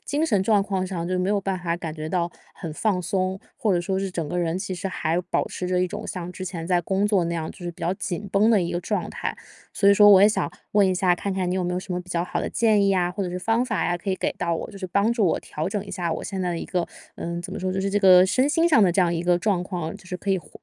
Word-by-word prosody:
精 295 +3 0
神 210 -11 +2
状 205 -1 +3
况 190 -2 -2
上 170 -3 -4
就 185 0 0
没 185 +1 0
有 205 -1 +1
办 190 -1 -2
法 170 -1 -2
感 165 -3 -5
觉 155 -1 -5
到 175 0 -1 0.2
很 165 -4 -6
放 190 +3 0
松， 185 +2 -1 0.2
或 215 - +1
者 175 - +1
说 190 +2 -1
是 195 -1 -2
整 165 -4 -3
个 180 - -2
人 170 0 0
其 185 0 -4
实 180 +2 -4
还 170 -1 -1
保 - - +1
持 180 - -5
着 180 0 +1
一 180 - +2
种 - - -6
像 180 -1 -5
之 185 +1 -7
前 175 -3 -5
在 180 -1 +2
工 190 +4 0
作 195 -5 +2
那 170 0 -2
样， 160 -1 -3
就 - - -14
是 175 -2 -5
比 - - -19
较 175 - 0
紧 195 +1 -4
绷 205 +3 +4
的 215 -4 +4
一 170 - -2
个 175 - -1
状 205 +3 -2
态。 - - -4 0.4
所 200 - +3
以 - - +6
说 205 +1 +7
我 195 -1 +8
也 205 - +8
想 215 - -1 0.2
问 205 -1 +5
一 185 - +1
下， 180 -1 +3
看 200 +2 -3
看 185 -2 -1
你 180 - 0
有 185 - -1
没 175 - -1
有 180 - -1
什 185 - -6
么 180 - -2
比 180 - -15
较 170 -1 0
好 - - -3
的 - - -2
建 220 -3 +3
议 - - +3
呀， 180 -2 +2
或 195 +2 -3
者 185 - -2
是 180 - -3
方 225 +5 +1
法 225 -5 -1
呀， 175 0 0
可 185 - -7
以 - - +1
给 - - -1
到 170 - 0
我， 165 - -5
就 200 - -10
是 190 - -4
帮 200 +5 +2
助 225 -4 +1
我 - - +1
调 155 +4 -4
整 205 0 -3
一 195 - -10
下 175 -3 -2
我 - - -4
现 195 -2 -4
在 180 - -1
的 170 - -2
一 - - -5
个 180 -2 -1 0.3
呃， 170 0 -4
怎 185 +1 -7
么 - - -4
说， 185 0 -2
就 190 - -1
是 195 - -1
这 205 - +2
个 185 -2 +7
身 260 +8 +2
心 330 +2 +3
上 270 -10 +5
的 180 - +4
这 190 - +2
样 175 -1 +3
一 165 - -2
个 175 0 +3
状 185 -2 0
况， 175 -4 -4
就 185 - -18
是 180 - -4
可 195 - -3
以 190 - +2
恢 - - -15
185 Hz, 360 characters per minute, -24 LUFS, 175-200 Hz, 0.4 s, 我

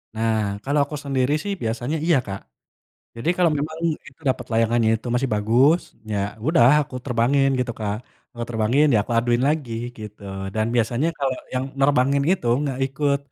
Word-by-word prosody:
Nah 110 0 +1 0.2
kalau 145 +2 +1
aku 150 - -7
sendiri 135 0 +1
sih 200 -1 -2
biasanya 120 +6 -2
iya 170 -5 +4
Kak, 95 -1 -5 0.8
jadi 115 +8 -3
kalau 175 -3 +3
memang 155 +2 -4 0.3
itu 135 +4 -20
dapet 130 - -1
layangannya 115 0 +2
itu 115 - -12
masih 130 +1 +1
bagus 125 +11 +4 0.3
ya 105 - -1 0.3
udah 155 -7 +5 0.2
aku 135 -3 -6
terbangin 135 +2 +2
gitu 120 -2 -1
Kak, 105 -1 -2 0.4
eee, 120 0 -4
terbangin 120 +6 +2
ya - - +5
aku - - -5
aduin 120 +1 +1
lagi 145 -6 -1 0.3
gitu 105 0 -9 0.3
dan 110 0 +1
biasanya 120 +6 +1
kalau 135 -2 0 0.2
yang 130 +1 0 0.2
nerbangin 140 0 +3
itu 150 -10 -2 0.2
nggak 135 -3 -2
ikut, 140 +1 0
130 Hz, 170 wpm, -23 LUFS, 115-140 Hz, 0.8 s, udah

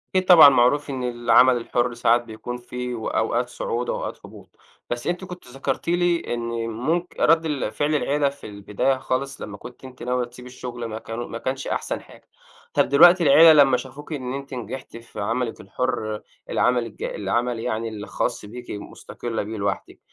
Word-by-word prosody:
أكيد 185 0 +3
طبعًا 165 -6 +10
معروف 140 +3 +3
إن 130 -2 -3
العمل 120 +1 +4
الحُر 120 +1 -1
ساعات 120 +1 +3
بيكون 115 +2 -7
في 125 0 -5
وأوقات 120 +1 -1
صعود 120 0 -3
وأوقات - - -4
هبوط، - - -14 0.4
بس 120 0 -3
أنتِ 180 +2 -1
كُنتِ 180 -7 -10
ذكرتِ 135 +5 -4
لي 175 -5 +1
إن 120 - -2 0.3
ممك 160 +11 -2
رد 165 +1 +4
ال 150 -3 -2
فعل 150 +1 0
العيلة 145 0 +1
في 140 -3 -11
البداية 105 +6 -1
خالص 135 +1 -3
لمّا 105 -1 -7
كُنتِ 125 +5 -12
أنتِ 130 -2 -11
ناوية 125 0 0
تسيبِ 125 +1 -13
الشغل 125 -1 -7
ما 110 0 -5
كانوا 115 +2 -6
ما 115 - -6
كانش 130 +2 -3
أحسن - - -2
حاجة، - - -18 0.5
طَب - - +2
دلوقتي 175 +5 +7
العيلة 160 +3 +8
لمّا 135 -2 +2
شافوكِ 145 +5 -8
إن 130 -3 -4
أنتِ 140 0 -6
نجحتِ 125 0 -7
في 115 -2 -11
عملِك 115 +3 -2
الحُر، 110 0 -3 0.3
العمل 125 -1 +2
الج 110 - -9
العمل 120 +4 -1
يعني 115 0 -2
الخاص 110 +1 -3
بيكِ 120 +3 -9
مُستقلة 110 +2 -6
بيه 110 +2 -6
لوحدِك، 100 0 -3
125 Hz, 175 wpm, -23 LUFS, 115-140 Hz, 0.5 s, طبعًا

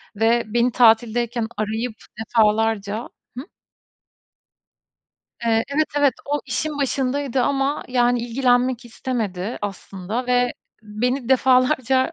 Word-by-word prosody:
ve 230 +2 +2
beni 240 +3 +1
tatildeyken 235 0 +2
arayıp 220 +2 -2 0.2
defalarca 220 -1 +1 0.3
Hı? 260 - -4 2.0
Eee, 225 -1 +2
evet, 310 +1 +2
evet, 285 -2 +4 0.2
o, 295 - +1
işin 295 +3 -3
başındaydı 270 -1 -1
ama, 280 +2 0
yani 245 -1 +2
ilgilenmek 245 0 +1
istemedi 225 -5 -4
aslında 205 +4 -5
ve 245 0 +2 0.3
beni 245 +4 -2
defalarca, 260 +1 +3
245 Hz, 100 wpm, -22 LUFS, 225-260 Hz, 2.0 s, evet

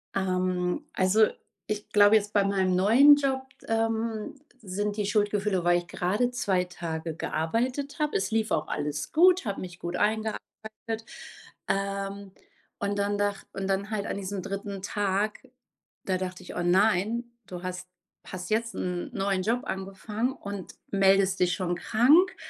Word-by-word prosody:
Ähm, 185 +4 0
also, 190 +4 +4 0.4
ich 210 -1 -4
glaube 205 +1 +6
jetzt 210 -1 +1
bei 205 - +4
meinem 190 -2 +1
neuen 235 +10 +7
Job, 270 -2 0 0.3
ähm, 225 -1 -1 0.3
sind 205 +3 -2
die 210 - 0
Schuldgefühle, 205 -2 +1
weil 175 0 +4
ich 175 - -11
gerade 205 +9 0
2 195 -7 +1
Tage 165 -2 -5
gearbeitet 250 - -2
habe. 300 -1 0
Es 190 - -2
lief 220 0 +1
auch 155 - 0
alles 150 0 -3
gut, 360 0 +5
habe 200 -2 -3
mich 180 -1 -8
gut 175 +1 -4
eingearbeitet. 220 +2 0 1.3
Ähm, 195 0 -2 0.5
und 200 0 -1
dann 205 0 0
dach 205 -1 -1
und 195 0 -3
dann 195 +2 -1
halt 205 -2 -2
an - - -3
diesem 200 0 -4
3. 195 +1 -5
Tag, 205 +1 -1 0.7
da 185 -1 +1
dachte 185 0 -5
ich: - - -9
„Oh, 175 - -1
nein, 205 +5 +2 0.2
du 180 -1 -7
hast 185 0 -5 0.4
hast 180 -1 -6
jetzt 230 +1 0
'n 180 -1 -3
neuen 195 -1 0
Job 230 +5 +1
angefangen 210 +5 -3
und 200 -7 -7 0.2
meldest 195 -1 +4
dich 180 0 +3
schon 180 -3 -1
krank.” 270 - +4
200 Hz, 155 wpm, -27 LUFS, 185-220 Hz, 1.3 s, neuen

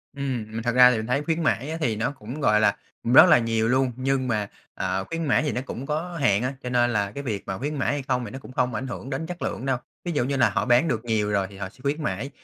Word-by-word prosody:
Ừm, 135 -5 -3
mà 110 +1 -5
thật 115 - 0
ra 125 0 +8
thì 120 - 0
mình 110 0 -4
thấy 140 +4 0
khuyến 165 +1 -1
mãi 140 -2 0
á, 160 - -3
thì 115 -7 +1
nó 115 +5 -1
cũng, 135 +2 -8
gọi 105 -5 +4
là, 110 - +3 0.4
rất - - +10
là - - +7
nhiều 115 -1 0
luôn, 130 +1 +2
nhưng 130 0 0
mà, 105 -4 -1 0.3
ờ, 95 +1 -2
khuyến 165 0 -2
mãi 145 +1 +2
thì 150 - 0
nó 125 - -2
cũng 135 -1 -6
có 165 +4 -3
hạn 105 -4 +3
á, 130 +2 -1
cho 125 - -3
nên 120 -1 +3
là 100 -2 0
cái 140 +6 -6
việc 105 -7 -3
mà 95 - -3
khuyến 145 +6 -3
mãi 135 - 0
hay 145 -1 -3
không 125 -2 0
thì - - -8
nó 135 - -7
cũng 135 - -12
không 125 -1 0
ảnh 130 +5 -3
hưởng 130 +1 -6
đến 160 - -3
chất 175 0 -7
lượng 125 - -3
đâu. 135 -2 +1 0.3
Ví 175 - -1
dụ 145 -6 +1
như 140 +2 -1
là 130 - +4
họ - - -1
bán 125 +6 +4
được 115 -5 -2
nhiều 110 -3 0
rồi 100 -2 +1
thì 100 - -13
họ 95 -1 -5
sẽ 100 - -24
khuyến 145 +3 -1
mãi, 110 +3 -2
125 Hz, 310 wpm, -25 LUFS, 110-140 Hz, 0.4 s, rất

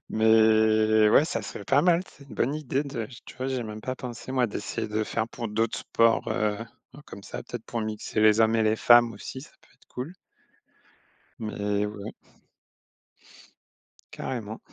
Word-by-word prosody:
Mais 110 -1 +4
ouais, 150 - +6
ça 115 - -3
serait 100 - -8
pas 140 +6 +3
mal. 175 -1 +4
C'est 140 - -17
une - - -10
bonne 140 +4 0
idée 145 -2 -1
de 130 -6 -5 0.2
tu - - -12
vois? 130 +1 -3
J'y 130 - -1
ai 120 - -2
même 110 -1 -7
pas 130 - -3
pensé 125 +1 -7
moi, 125 -2 +2
d'essayer 110 +1 -4
de 110 +1 -1
faire 115 +1 -2
pour 115 -2 -5
d'autres 110 +2 -1
sports, 115 0 +2
heu, 105 -1 0 0.5
comme 100 - -10
ça, - - -7
peut-être 120 -2 -8
pour 120 - -3
mixer 110 0 -3
les 110 +1 +5
hommes 110 0 +4
et 110 - +2
les 110 0 +2
femmes 120 0 +6
aussi, 130 +6 -8
ça - - -14
peut - - -26
être - - -28
cool. 135 +8 -6 1.2
Mais 105 -1 -2
ouais. 105 0 -7 2.0
Carrément. 110 -3 -5
110 Hz, 180 wpm, -26 LUFS, 110-125 Hz, 2.0 s, ouais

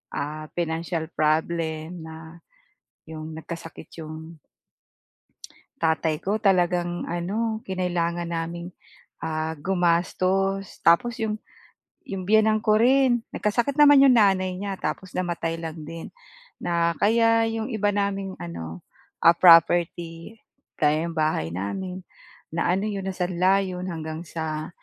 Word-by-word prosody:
ah, 155 +1 -4
financial 165 -1 -2
problem 160 +2 -1
na 160 +1 -11 0.7
yung 155 0 -7
nagkasakit 165 0 -9
yung 160 +1 -9 1.5
tatay 160 -1 +1
ko 205 +3 0
talagang 175 -3 +1
ano 210 +6 -2
kinailangan 175 -2 -1
naming 170 +1 -4 0.5
ah, 160 0 -2
gumastos. 185 +3 0
Tapos 230 +9 +3
iyong 215 -1 -1 0.7
iyong 190 -2 -5
biyenan 220 0 +4
ko 215 0 +3
rin, 250 0 +4
nagkasakit 240 +7 0
naman 290 -2 +8
iyong 255 -2 +6
nanay 190 -4 +4
niya, 200 -1 -4
tapos 180 +4 -5
namatay 170 -2 -2
lang 165 -1 -6
din. 165 0 -7 0.5
Na 170 -1 +1
kaya 230 +1 +4
iyong 225 +2 -3
iba 210 -2 +1
naming 195 -1 -2
ano, 85 0 -7 0.4
ah, 170 - +9
property, 170 +2 +4 0.4
gaya 155 +2 +2
iyong 170 - -6
bahay 155 - 0
namin, 180 - -4 0.5
na 170 - 0
ano 195 +3 0
iyon 195 -2 -3
na 190 - -3
sanla 185 +2 +2
iyon 185 0 -5
hanggang 160 -2 -5
sa 155 -1 -4
175 Hz, 120 wpm, -25 LUFS, 160-195 Hz, 1.5 s, ah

